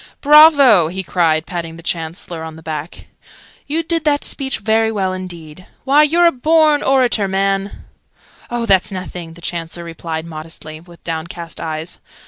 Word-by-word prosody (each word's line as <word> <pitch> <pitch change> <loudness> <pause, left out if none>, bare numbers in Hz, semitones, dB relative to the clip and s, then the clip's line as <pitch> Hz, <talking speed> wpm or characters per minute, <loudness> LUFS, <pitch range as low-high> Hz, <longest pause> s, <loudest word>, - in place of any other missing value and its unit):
"Bravo!" 285 - +7
he 190 +3 -4
cried, 165 -3 +1
patting 165 -2 -5
the 165 - -12
Chancellor 165 0 -4
on 160 -1 -8
the 160 - -14
back. 155 +1 -6 0.6
"You 315 +3 -1
did 330 -1 -2
that 290 -1 +1
speech 270 -2 -2
very 220 +1 +1
well 190 -3 -1
indeed. 180 -2 -9 0.2
Why, 280 +3 +4
you're 330 +4 +4
a 340 - +6
born 305 +2 +3
orator, 250 -6 +2
man!" 195 +1 -2 0.6
"Oh, 240 -1 -2
that's 195 -2 +3
nothing!" 180 -3 -7
the 170 - -15
Chancellor 170 0 -5
replied, 165 -1 -6
modestly, 155 -1 -9
with 170 +1 -17
downcast 170 +1 -6
eyes. 160 +2 -5
185 Hz, 155 wpm, -17 LUFS, 165-255 Hz, 0.6 s, Bravo